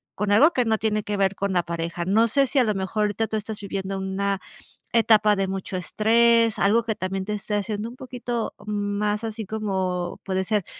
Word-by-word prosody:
con 205 +1 -1
algo 290 +11 +6
que 250 - +2
no 220 -1 +1
tiene 215 -1 0
que 205 -1 -3
ver 195 0 +1
con 200 0 -2
la 175 -2 +1
pareja. 170 +1 -4
No 220 +5 +3
sé, 275 +3 +3
si 280 - -3
a 255 - +6
lo 215 -2 +1
mejor 195 +2 -1
ahorita 210 +2 0
tú 220 - -4
estás 215 0 -4
viviendo 195 -1 -4
una 195 +1 -1 0.5
etapa 215 -2 +4
de 195 -1 0
mucho 190 0 -4
estrés, 230 +4 +3
algo 225 +4 +3
que 220 -2 -2
también 190 +1 -3
te 210 +2 -3
esté 210 0 -3
haciendo 205 +2 -2
un 245 - -11
poquito 245 -2 -4
más 210 +1 -1
así 220 -1 -4
como, 190 -4 -2
puede 190 -1 0
ser, 210 -2 0
210 Hz, 210 wpm, -24 LUFS, 195-220 Hz, 0.5 s, algo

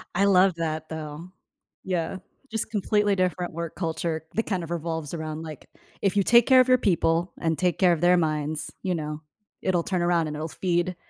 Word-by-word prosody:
I 195 - +3
love 190 -2 +5
that 160 -1 -3
though, 155 +2 -7 0.5
yeah, 180 -1 -2 0.3
just 225 0 -3
completely 205 -1 +1
different 180 -2 -1
work 170 -1 -5
culture 160 -2 -2
that 225 - +1
kind 185 -5 -2
of 165 - -8
revolves 160 -2 -3
around, 155 -1 -5
like, 155 -3 -9 0.3
if 200 0 +1
you 200 - +4
take 235 +3 +5
care 260 -1 +7
of 255 - +5
your 255 0 +5
people 175 -5 +1
and 165 -2 0
take 180 -3 0
care 180 -2 +5
of 160 - -3
their 180 +1 +5
minds, 155 -2 -1
you 185 -1 0
know, 150 -1 -5 0.4
it'll 180 -3 +1
turn 185 -1 -1
around 175 -2 +2
and 150 - -5
it'll 155 +2 -4
feed 175 +1 -1
170 Hz, 200 wpm, -25 LUFS, 160-185 Hz, 0.5 s, care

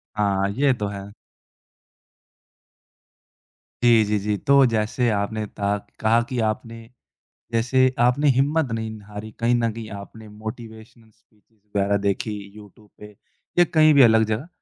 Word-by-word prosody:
हाँ, 100 -1 0
ये 135 +4 +2
तो 105 -4 -3
है। 100 -1 -7 2.8
जी, 115 -2 +6
जी, 105 0 0
जी। 105 +1 -2
तो 140 +2 +4
जैसे 115 +1 0
आपने 105 +1 -2
तहा 100 0 -2 0.2
कहा 115 +2 +3
कि 125 -2 -3
आपने 115 +1 -7 0.6
जैसे 130 +3 +2
आपने 125 +5 +3
हिम्मत 145 -1 +1
नहीं 110 -1 -4
हारी। 105 +1 -8
कहीं 120 +1 +2
न 115 -1 0
कहीं 110 0 -8
आपने 110 +2 -12
मोटिवेशनल 110 +1 -10
स्पीचेस 110 0 -35 0.2
वगैरह 100 0 +2
देखी 100 +2 -1 0.2
यूट्यूब 105 0 -16
पे 105 - -10 0.5
या 175 - +7
कहीं 155 -1 +6
भी 140 - +6
अलग 110 -2 +6
जगह। 125 +10 -3
110 Hz, 140 wpm, -22 LUFS, 105-120 Hz, 2.8 s, या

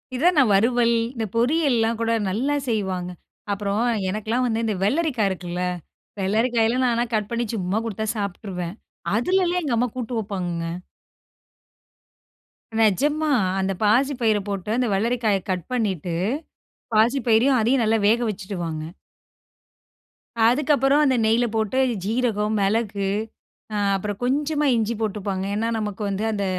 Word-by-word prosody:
இதான் 335 +7 +3
நான், 255 -6 +5
வறுவல், 235 +3 +3 0.2
இந்த 230 -4 -3
பொரியல்லாம் 240 -3 +2
கூட 230 0 0 0.2
நல்லா 250 +10 0
செய்வாங்க! 190 -5 -2 0.4
அப்புறம் 200 +1 -1 0.3
எனக்கெல்லாம் 220 +5 -1
வந்து 230 -1 0
இந்த 215 -2 0
வெள்ளரிக்கா 265 +1 +1
இருக்குல்ல. 180 -1 -4 0.6
வெள்ளரிக்காயல்லாம் 230 +5 +2
நான்லாம் 235 0 0
கட் 210 -1 -1
பண்ணி 235 0 -1
சும்மா 190 0 -1
குடுத்தா 220 0 -3
சாப்ட்ருவேன். 190 -3 -4 0.4
அதிலலாம் 360 - +1
எங்க 270 -6 0
அம்மா 245 +2 +1
கூட்டு 245 0 -4
வப்பாங்கங்க! 180 -5 -3 2.1
நெஜமா, 290 +9 +2 0.3
அந்த 190 0 0
பாசி 250 +7 +3
பயிர 220 -2 +3
போட்டு, 200 0 -4
அந்த 250 -1 +1
வெள்ளரிக்காய 220 0 +1
கட் 180 -3 -1
பண்ணிட்டு, 190 -8 -1 0.8
பாசி 235 +6 +4
பயிரையும், 240 +4 +4
அதையும் 240 +4 +2
நல்லா 225 +1 +3
வேக 225 +3 +4
வச்சுடுவாங்க. 180 -6 -4 1.6
அதுக்கப்புறம், 280 +2 +3
அந்த 265 -2 +3
நெய்ல 230 +2 +3
போட்டு 220 +3 0 0.3
சீரகம், 220 -1 0
மிளகு, 200 -1 0 0.6
ஆ, - - -1 0.2
அப்புறம் 205 +1 -4
கொஞ்சமா 295 +3 0
இஞ்சி 225 0 0
போட்டுப்பாங்க. 200 -3 -2
ஏன்னா, 225 +2 0
நமக்கு 210 -1 -4
வந்து 200 +2 -2
அந்த 200 -1 -1
220 Hz, 125 wpm, -23 LUFS, 200-245 Hz, 2.1 s, நான்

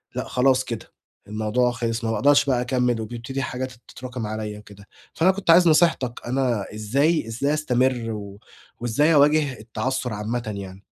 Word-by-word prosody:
لأ - - -2
خلاص 130 0 +2
كده 115 -3 -6 0.4
الموضوع 110 +4 0
خِلص، 115 -1 -3
ما 115 - 0
باقدرش 140 +6 +4
بقى 125 -3 +1
أكمِّل 125 -2 0
وبيبتدي 120 +4 -5
حاجات 130 -1 -4 0.2
تتراكم 125 -3 -6
عليَّ 105 -1 -5
وكده، 100 -1 -15 0.3
فأنا 185 +3 +4
كنت 190 -2 -7
عايز 175 +1 +6
نصيحتَك، 155 -7 +2
أنا 125 -5 0
إزاي 135 +6 +1
إزاي 140 +6 -1
أستمر 125 -5 0
و 100 -1 -7 0.4
وإزاي 145 +7 +2
أواجه 145 -3 +3
التعثُّر 125 +2 -3
عامةّ 115 +3 -3
يعني؟ 95 0 -9
125 Hz, 155 wpm, -23 LUFS, 110-135 Hz, 0.4 s, عايز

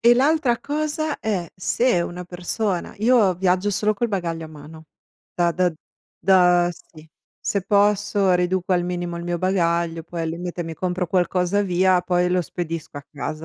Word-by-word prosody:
e 240 +1 +6
l'altra 270 -2 +2
cosa 305 +1 -2
è: 190 -6 -2
se 210 +2 +1
una 175 +1 -4
persona 180 +2 -3
io 220 -4 +4
viaggio 185 +2 +1
solo 210 +2 +1
col 235 +3 -1
bagaglio 170 -5 -3
a - - -9
mano, 155 +1 -12 0.5
da 175 -1 +2
da 180 0 +1 0.5
da 180 -1 +4
sì. 160 -1 -17 0.3
Se 200 - -1
posso 205 -1 +2
riduco 180 +1 0
al 175 -1 +2
minimo 175 -1 -3
il 170 - -6
mio 175 0 -2
bagaglio, 170 -2 0
poi 170 +1 -5
al 160 - -2
limite, 175 +1 -5
mi 165 0 -6
compro 180 +1 -2
qualcosa 180 +2 +1
via, 185 -1 +3
poi 180 0 +1
lo 180 0 +2
spedisco 165 -3 -5
a 145 - -8
casa. 155 +2 -6
180 Hz, 170 wpm, -22 LUFS, 170-200 Hz, 0.5 s, e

